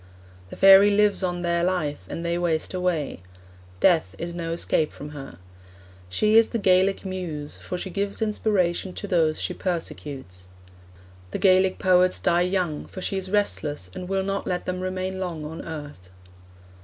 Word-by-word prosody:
The -, -, -8 dB
fairy 195 Hz, +1 st, +8 dB
lives 205 Hz, 0 st, +3 dB
on 175 Hz, -1 st, -2 dB
their 170 Hz, 0 st, +1 dB
life, 155 Hz, -, -1 dB
and 170 Hz, -, -5 dB
they 170 Hz, 0 st, 0 dB
waste 165 Hz, -1 st, -1 dB
away. 180 Hz, -, -1 dB, 0.6 s
Death 160 Hz, -, +3 dB
is 170 Hz, 0 st, -5 dB
no 170 Hz, -1 st, -4 dB
escape 160 Hz, -2 st, 0 dB
from 145 Hz, -, -8 dB
her. 135 Hz, -, -9 dB, 0.7 s
She 215 Hz, -, +3 dB
is 225 Hz, -, +4 dB
the 235 Hz, -, -2 dB
Gaelic 195 Hz, -1 st, +2 dB
muse, 170 Hz, -6 st, -5 dB
for 180 Hz, -, -5 dB
she 190 Hz, +1 st, -5 dB
gives 200 Hz, +1 st, -1 dB
inspiration 200 Hz, -4 st, 0 dB
to -, -, -6 dB
those 165 Hz, -5 st, +1 dB
she -, -, -2 dB
persecutes. 140 Hz, -, -5 dB, 0.8 s
The -, -, -3 dB
Gaelic 185 Hz, -1 st, +4 dB
poets 185 Hz, 0 st, +3 dB
die 175 Hz, 0 st, +2 dB
young, 180 Hz, -4 st, -1 dB
for -, -, -9 dB
she -, -, -1 dB
is 190 Hz, -1 st, -3 dB
restless, 150 Hz, -, -1 dB
and 180 Hz, 0 st, -7 dB
will 195 Hz, 0 st, 0 dB
not 195 Hz, +1 st, -3 dB
let 180 Hz, -1 st, -2 dB
them 180 Hz, 0 st, -3 dB
remain 185 Hz, 0 st, -3 dB
long 170 Hz, -5 st, -4 dB
on 160 Hz, +2 st, -7 dB
earth.' 145 Hz, -, -8 dB
180 Hz, 170 wpm, -25 LUFS, 160-190 Hz, 0.8 s, fairy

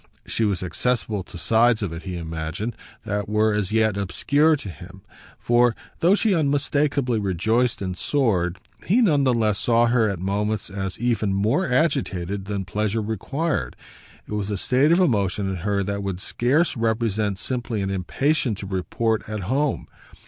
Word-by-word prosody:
She 115 Hz, -, 0 dB
was 100 Hz, -3 st, -1 dB
accessible 110 Hz, +1 st, -1 dB
to -, -, -10 dB
sides 115 Hz, +5 st, +3 dB
of 90 Hz, -5 st, -3 dB
it, 80 Hz, -, -6 dB
he 90 Hz, -2 st, -5 dB
imagined, 80 Hz, +7 st, -4 dB, 0.3 s
that 105 Hz, -1 st, -2 dB
were 105 Hz, 0 st, +2 dB
as 105 Hz, -2 st, -1 dB
yet 110 Hz, -2 st, +2 dB
obscure 145 Hz, -, +2 dB
to 135 Hz, -, -6 dB
him; 90 Hz, +5 st, -13 dB, 0.3 s
for, 120 Hz, -1 st, +3 dB, 0.2 s
though 180 Hz, +4 st, +5 dB
she 215 Hz, -1 st, +2 dB
unmistakeably 140 Hz, -5 st, +1 dB
rejoiced 110 Hz, +5 st, 0 dB
and 95 Hz, -1 st, -3 dB
soared, 95 Hz, -, 0 dB, 0.3 s
he 210 Hz, +8 st, +4 dB
none 150 Hz, -, +3 dB
the 130 Hz, -, +4 dB
less 110 Hz, -3 st, +1 dB
saw 120 Hz, 0 st, +3 dB
her 115 Hz, -2 st, +3 dB
at 100 Hz, -, -2 dB
moments 100 Hz, +3 st, -2 dB
as 95 Hz, -1 st, -4 dB
even 110 Hz, -4 st, 0 dB
more 120 Hz, -, +1 dB
agitated 100 Hz, -, 0 dB
than 100 Hz, -2 st, -3 dB
pleasure 105 Hz, +4 st, -1 dB
required. 110 Hz, -, -2 dB, 0.5 s
It -, -, -8 dB
was 105 Hz, -1 st, -2 dB
a 105 Hz, -, -1 dB
state 135 Hz, -, +2 dB
of 170 Hz, -, +5 dB
emotion 100 Hz, -, +1 dB
in 95 Hz, -1 st, -2 dB
her 100 Hz, +2 st, 0 dB
that 100 Hz, +1 st, -3 dB
could 95 Hz, -2 st, -3 dB
scarce 135 Hz, -, +1 dB
represent 110 Hz, -3 st, 0 dB
simply 120 Hz, -3 st, -3 dB
an 95 Hz, -, -2 dB
impatience 115 Hz, -, 0 dB
to -, -, -5 dB
report 105 Hz, +4 st, -1 dB
at 105 Hz, -1 st, -3 dB
home. 135 Hz, +9 st, 0 dB
110 Hz, 170 wpm, -23 LUFS, 95-125 Hz, 0.5 s, though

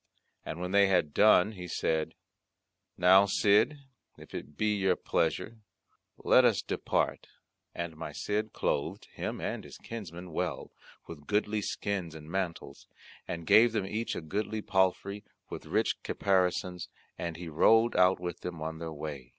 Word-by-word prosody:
And 80 Hz, -, -6 dB
when 90 Hz, +1 st, -4 dB
they 100 Hz, 0 st, +5 dB
had 90 Hz, -6 st, +1 dB
done 105 Hz, -1 st, +5 dB
he 90 Hz, -4 st, -8 dB
said, 80 Hz, -2 st, -1 dB, 0.8 s
"Now, 95 Hz, +3 st, +6 dB
Cid, 105 Hz, +9 st, +3 dB, 0.4 s
if -, -, -14 dB
it 75 Hz, +2 st, -8 dB
be 105 Hz, 0 st, +1 dB
your 95 Hz, -2 st, +2 dB
pleasure 90 Hz, +7 st, -1 dB, 0.6 s
let -, -, +5 dB
us -, -, +3 dB
depart." -, -, -1 dB, 0.5 s
And 85 Hz, -1 st, -4 dB
my -, -, -6 dB
Cid 105 Hz, +1 st, -2 dB
clothed 70 Hz, -, -2 dB
him -, -, -4 dB
and -, -, -4 dB
his -, -, -11 dB
kinsmen 90 Hz, -6 st, -8 dB
well -, -, -3 dB, 0.4 s
with 75 Hz, -3 st, -11 dB
goodly 105 Hz, 0 st, 0 dB
skins 95 Hz, -5 st, -3 dB
and 80 Hz, 0 st, -10 dB
mantles, 95 Hz, -3 st, -4 dB, 0.4 s
and 85 Hz, -1 st, -5 dB
gave 115 Hz, +6 st, +6 dB
them 105 Hz, -4 st, 0 dB
each 110 Hz, +4 st, -3 dB
a -, -, -4 dB
goodly 105 Hz, +6 st, -3 dB
palfrey, 95 Hz, +2 st, 0 dB, 0.3 s
with -, -, -7 dB
rich -, -, 0 dB
caparisons, 90 Hz, -2 st, 0 dB, 0.3 s
and 85 Hz, -2 st, -4 dB
he 85 Hz, 0 st, -7 dB
rode 110 Hz, +9 st, +4 dB
out 90 Hz, 0 st, +4 dB
with 90 Hz, 0 st, -5 dB
them 90 Hz, -2 st, -6 dB
on 80 Hz, +1 st, -5 dB
their 85 Hz, -1 st, -5 dB
way. 75 Hz, -4 st, -7 dB
90 Hz, 155 wpm, -30 LUFS, 85-105 Hz, 0.8 s, Now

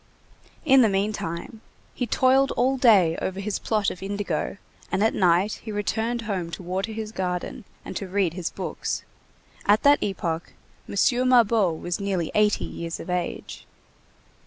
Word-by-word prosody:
In 270 Hz, -3 st, +7 dB
the 225 Hz, -, +5 dB
meantime, 195 Hz, 0 st, -3 dB, 0.3 s
he 245 Hz, -, -2 dB
toiled 265 Hz, +4 st, +3 dB
all 260 Hz, +3 st, +2 dB
day 205 Hz, -10 st, +5 dB
over 190 Hz, +1 st, -3 dB
his 200 Hz, 0 st, -2 dB
plot 215 Hz, -2 st, 0 dB
of 180 Hz, -, -9 dB
indigo, 200 Hz, -3 st, -3 dB, 0.3 s
and 200 Hz, -, +1 dB
at 220 Hz, -, +3 dB
night 185 Hz, +3 st, +2 dB
he 220 Hz, -, -7 dB
returned 225 Hz, +3 st, -1 dB
home 190 Hz, -6 st, -3 dB
to 185 Hz, -, -6 dB
water 190 Hz, +5 st, -2 dB
his 215 Hz, -1 st, -5 dB
garden, 185 Hz, +4 st, -3 dB, 0.2 s
and -, -, -7 dB
to 195 Hz, -, -5 dB
read 185 Hz, -3 st, 0 dB
his 180 Hz, -2 st, -3 dB
books. -, -, -4 dB, 0.6 s
At 210 Hz, +1 st, +4 dB
that 285 Hz, 0 st, +5 dB
epoch, 170 Hz, -4 st, -3 dB, 0.4 s
M. -, -, -5 dB, 0.3 s
Mabeuf 220 Hz, -8 st, +4 dB
was 175 Hz, +2 st, -3 dB
nearly 190 Hz, -5 st, -1 dB
eighty 210 Hz, -1 st, +2 dB
years 165 Hz, 0 st, -5 dB
of 180 Hz, -, -6 dB
age. 180 Hz, -1 st, -4 dB
200 Hz, 160 wpm, -25 LUFS, 180-225 Hz, 0.6 s, In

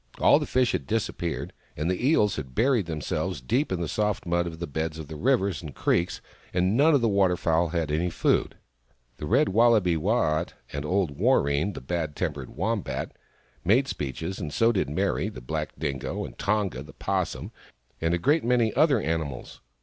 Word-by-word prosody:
All -, -, +5 dB
the -, -, -4 dB
fish 130 Hz, -1 st, +2 dB
had -, -, -3 dB
disappeared, 100 Hz, -7 st, -2 dB, 0.2 s
and 75 Hz, +2 st, -1 dB
the 90 Hz, +8 st, 0 dB
eels 105 Hz, -, +3 dB
had 65 Hz, -4 st, -6 dB
buried 120 Hz, -6 st, +2 dB
themselves 80 Hz, +1 st, -2 dB
deep 125 Hz, -, 0 dB
in 95 Hz, -, -1 dB
the 85 Hz, -, -1 dB
soft 105 Hz, +4 st, -1 dB
mud 85 Hz, 0 st, +1 dB
of 80 Hz, -1 st, -6 dB
the 85 Hz, -, -4 dB
beds 80 Hz, +1 st, -3 dB
of 80 Hz, -2 st, -7 dB
the 80 Hz, -, -6 dB
rivers 100 Hz, -, +1 dB
and 75 Hz, -6 st, -9 dB
creeks, 85 Hz, +1 st, 0 dB, 0.3 s
and 90 Hz, +3 st, +2 dB
none 150 Hz, +4 st, +5 dB
of 140 Hz, -, +3 dB
the 115 Hz, -, +3 dB
water 95 Hz, -4 st, +3 dB
fowl 85 Hz, 0 st, +2 dB
had 80 Hz, -2 st, -2 dB
any 85 Hz, +4 st, +1 dB
food. -, -, +1 dB, 0.6 s
The 75 Hz, -, -5 dB
Red 135 Hz, -, +3 dB
Wallaby, 105 Hz, -5 st, +4 dB
Waat, 85 Hz, -3 st, 0 dB, 0.2 s
and 70 Hz, +1 st, -3 dB
old 90 Hz, -4 st, 0 dB
Warreen, 70 Hz, +8 st, +2 dB
the -, -, -6 dB
bad 80 Hz, +1 st, -3 dB
tempered 75 Hz, -7 st, -3 dB
Wombat, -, -, -2 dB, 0.5 s
made 120 Hz, +10 st, +3 dB
speeches, 80 Hz, -, -4 dB
and 75 Hz, -6 st, -4 dB
so 115 Hz, +9 st, +3 dB
did 95 Hz, -9 st, 0 dB
Meri, 75 Hz, -, 0 dB
the -, -, -9 dB
black -, -, -3 dB
Dingo, 70 Hz, -3 st, -3 dB
and -, -, -10 dB
Tonga, 100 Hz, -10 st, -1 dB
the 70 Hz, -, -11 dB
'Possum, -, -, -2 dB, 0.5 s
and 80 Hz, +1 st, +2 dB
a -, -, 0 dB
great 145 Hz, -, +2 dB
many 120 Hz, -2 st, +2 dB
other 150 Hz, -6 st, +4 dB
animals. 80 Hz, -7 st, -3 dB
85 Hz, 190 wpm, -26 LUFS, 75-110 Hz, 0.6 s, All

